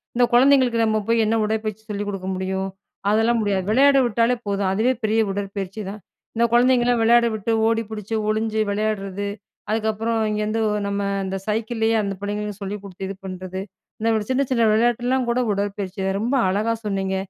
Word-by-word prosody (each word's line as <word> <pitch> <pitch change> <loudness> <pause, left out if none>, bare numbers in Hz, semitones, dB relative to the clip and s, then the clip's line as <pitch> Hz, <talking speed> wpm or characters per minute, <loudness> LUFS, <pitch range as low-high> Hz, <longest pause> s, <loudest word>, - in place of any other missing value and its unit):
இந்த 245 - +5
குழந்தைங்களுக்கு 255 -2 +5
நம்ம 220 0 +1
போய் 230 -1 +3
என்ன 220 +1 +1
உடற்பயிற்சி 215 0 -2
சொல்லிக் 205 0 -3
கொடுக்க 190 -2 -5
முடியும், 190 +1 -2 0.4
அதெல்லாம் 225 +2 +3
முடியாது. 200 -3 0
விளையாட 275 +3 +5
விட்டாலே 235 +1 +2
போதும், 200 -1 0
அதுவே 235 +6 +2
பெரிய 220 +1 +2
உடற்பயிற்சிதான். 200 +1 -5 0.3
இந்த 235 +1 +3
குழந்தைங்கலாம் 245 -1 +4
விளையாட 235 +1 +5
விட்டு, 215 +2 -2 0.2
ஓடி 225 0 +2
பிடிச்சு 215 +1 -4
ஒளிஞ்சு 220 0 0
விளையாடுறது, 200 -1 -2 0.4
அதுக்கப்புறம் 220 +1 0
இங்கேருந்து, 215 +1 -1 0.3
நம்ம 200 0 -1 0.2
இந்த 190 0 -3
சைக்கிளேயே 225 +1 0
அந்த 200 -1 -2
பிள்ளைங்களுக்கு 210 0 -4
சொல்லிக் 200 +1 -5
குடுத்து, 190 -1 -7
இது 195 - -5
பண்ணுறது, 185 0 -6 0.4
இந்த 220 -2 +1
சின்ன 270 +2 +2
சின்ன 235 -2 +3
விளையாட்டுலாம் 240 +3 +1
கூட 240 - +1
உடற்பயிற்சி 200 -1 -3
தான். 195 0 0
ரொம்ப 245 +5 0
அழகா 215 +4 +1
சொன்னிங்க. 195 -2 -1
215 Hz, 160 wpm, -22 LUFS, 200-230 Hz, 0.4 s, இந்த